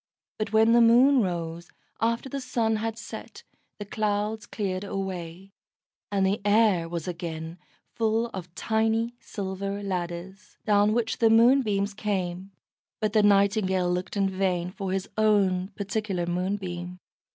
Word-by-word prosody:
But 215 -1 -2
when 220 +1 +5
the 235 0 +6
Moon 250 +4 +6
rose, 170 -3 -3 0.3
after 230 +3 0
the 275 +1 -4
sun 230 -3 0
had 225 +1 -3
set, 230 - -9 0.3
the 205 - -6
clouds 210 0 -2
cleared 190 -3 -3
away, 190 -2 -5 0.6
and 195 -1 +2
the 195 +2 0
air 205 -5 +3
was 170 -1 -4
again 165 -1 -5 0.3
full 225 0 +1
of 180 -2 -8
tiny 225 +1 0
silver 200 -1 -5
ladders, 185 +1 -5
down 210 0 +4
which 225 -1 -1
the 225 - +5
Moonbeams 225 -4 +4
came, 195 -2 -3 0.5
but 215 -1 -1
the 215 - +5
Nightingale 195 -3 +3
looked 180 +3 -3
in 195 -1 +2
vain 185 -2 -1
for 195 -1 -4
his 190 0 -2
own 195 -4 +3
particular 200 -3 -2
Moonbeam. 180 0 -3
200 Hz, 140 wpm, -26 LUFS, 185-220 Hz, 0.6 s, the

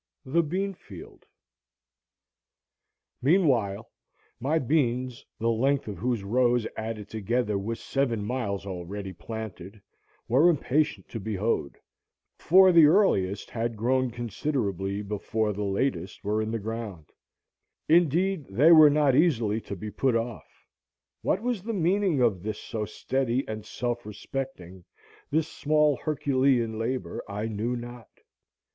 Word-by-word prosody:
The 155 +6 +2
Bean 190 +5 -2
Field - - -13 1.9
Meanwhile 125 - +2 0.5
my 145 +6 +1
beans, 130 -4 0
the 115 +1 +1
length 135 +4 +1
of 105 - -6
whose 120 -3 -1
rows, 120 +2 +2
added 110 -2 -5
together, 110 +1 -1
was 115 +4 -4
seven 120 -7 -1
miles 105 -5 -3
already 95 +1 -6
planted, 105 +1 -8 0.5
were 140 +9 +5
impatient 140 - 0
to 115 - -5
be 110 +1 -4
hoed, 95 -8 -1 0.6
for 190 +2 +6
the 165 -3 +7
earliest 105 - +2
had 115 -1 -2
grown 130 +3 +1
considerably 110 - -2
before 105 +1 -2
the 105 - -5
latest 95 -3 -2
were 105 +2 0
in 110 - -2
the 115 - -1
ground; 110 -6 -6 0.8
indeed 170 +1 +2
they 135 +12 +5
were 155 -2 +9
not 145 -3 +3
easily 120 -9 +2
to 100 - -6
be 105 +3 -7
put 130 +1 +1
off. 115 0 -5 0.6
What 195 - 0
was 245 -5 -1
the 225 +4 -4
meaning 180 -5 +2
of 100 -7 +2
this 105 +2 -4
so 110 -2 -4
steady 130 +4 -1
and 110 -1 -5
self 120 +2 -3
respecting, 105 -4 -7 0.5
this 155 +1 +1
small 150 -2 +2
Herculean 130 -6 +1
labor, 125 +3 -3
I 105 +2 -3
knew 110 +3 -2
not. 120 -1 -8
120 Hz, 130 wpm, -27 LUFS, 105-140 Hz, 1.9 s, were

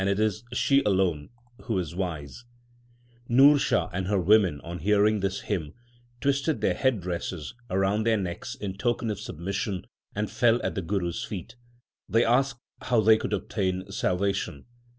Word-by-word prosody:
7 95 - 0
8 100 - +1
THE 110 0 +3 0.2
SIKH 135 +3 +3
RELIGION 95 -7 +1 2.0
Nurshah 135 +2 +5
and 95 0 -2
her 100 -1 +2
women, 95 -4 +4
on 85 +1 -7
hearing 105 +1 +3
this 95 0 -2
hymn, 85 -6 -3 0.4
twisted 140 +2 0
their - - +2
head 130 -7 +1
dresses 85 -2 -4 0.2
around 95 +3 +1
their 110 -1 +4
necks 90 -3 -4
in 100 -1 -6
token 120 -1 0
of 105 - -5
submission, 95 +3 -4 0.3
and 105 0 -2
fell 120 +1 +3
at - - -1
the 95 - -2
Guru 90 0 -1
s 115 +7 -4
feet. 110 +2 -7 0.5
They 115 +1 +3
asked 130 +2 +2 0.2
how 120 -3 +2
they 110 +1 +6
could - - -4
obtain 95 -2 -2
salvation. 95 -6 -1
100 Hz, 150 wpm, -27 LUFS, 95-115 Hz, 2.0 s, they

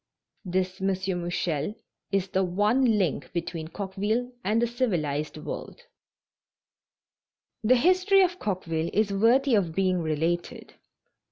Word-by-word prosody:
This 185 0 -2
M. 195 - +1
Mouchel 180 -2 -1 0.4
is 195 -1 0
the 190 0 +1
one 210 +6 +2
link 175 -8 -1
between 165 -2 -4
Coqueville 205 +7 -2
and 215 +4 +2
the 240 - +3
civilized 170 - -1
world. 155 - -7 1.8
The 245 +4 +5
history 370 +7 +4
of 360 0 -1
Coqueville 170 -5 -2
is 205 -1 +1
worthy 245 +6 +3
of 180 -7 +1
being 185 -2 +1
related. 165 +2 -2
190 Hz, 115 wpm, -27 LUFS, 175-230 Hz, 1.8 s, The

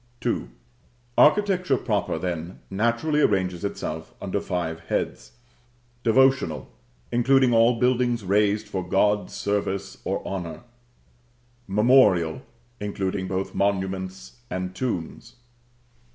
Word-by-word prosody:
II. - - 0 0.7
Architecture 180 -4 +4
proper, 105 -9 -1
then, 85 0 -4
naturally 120 +9 +1
arranges 95 -6 +1
itself 80 -5 -5
under 100 0 -2
five 85 -3 -3
heads: - - -3 0.7
Devotional; 130 - +2 0.4
including 130 +1 +4
all 115 +1 +4
buildings 125 -2 +2
raised 105 +2 +2
for 95 -3 -3
God's 100 +2 +1
service 100 -1 -2
or - - -3
honor. 85 -5 -5 1.1
Memorial; 100 -6 +4 0.4
including 100 -2 -2
both 95 +1 -3
monuments 95 -8 -2
and 90 0 -3
tombs. 95 -5 -4
100 Hz, 95 wpm, -25 LUFS, 90-120 Hz, 1.1 s, Architecture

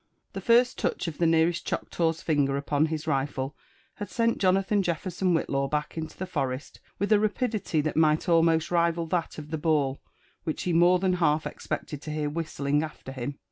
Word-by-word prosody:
The - - -5
first 245 +1 +4
touch - - -1
of 160 - -5
the 170 - +3
nearest 165 +1 +2
Choctaw's 165 -1 -1
finger 140 -3 +1
upon 145 +2 +1
his 155 -1 -4
rifle 135 -1 -1 0.4
had 205 -2 -5
gent 230 0 +1
Jonathan 195 +2 +2
Jefferson 180 0 0
Whillaw 140 -3 0
back 150 +1 -2
into 160 -1 -6
the 185 - -3
forest 135 -6 -3 0.2
with 200 +2 -1
a 210 - +6
rapidity 215 - 0
that 155 +1 -2
might 155 -1 +3
almost 165 -1 +3
rival 170 -1 +2
that 170 +1 -2
of 150 0 -8
the 160 - -2
ball 145 -4 +1 0.4
which 160 -3 -3
he 180 - 0
more 175 +2 +5
than 185 0 +1
half 160 -3 +2
ex - - -8
pected 145 -2 -4
to 155 - -6
hear 150 -1 -2
whistling 150 -2 -1
after 155 -4 -7
him. 135 +2 -5
160 Hz, 190 wpm, -27 LUFS, 150-180 Hz, 0.4 s, a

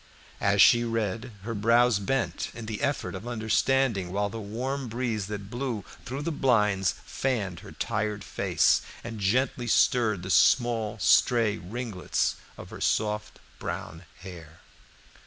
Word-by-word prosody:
As 100 +1 +5
she 120 -1 +6
read, 115 +1 -2
her 115 +2 -4
brows 115 +1 +3
bent 130 +5 -1
in 115 - -7
the 110 +2 -5
effort 140 0 -1
of 100 +5 -7
understanding, 110 -3 +1
while 100 +1 0
the 115 - -6
warm 125 +6 -4
breeze 115 -3 -2
that 100 -1 -6
blew 120 -5 -3 0.2
through 135 +4 -4
the 170 - -1
blinds 105 - +2
fanned 105 -10 -2
her - - -12
tired 105 -2 -2
face - - +2 0.2
and 115 -2 -6
gently 120 +4 0
stirred 110 -5 +3
the 95 - -3
small 115 +3 +3
stray 115 -4 +3
ringlets 105 0 -2 0.2
of - - -10
her - - -9
soft 105 -1 0 0.2
brown 80 +3 -6 0.2
hair. 85 -4 -11
110 Hz, 140 wpm, -27 LUFS, 100-120 Hz, 0.2 s, she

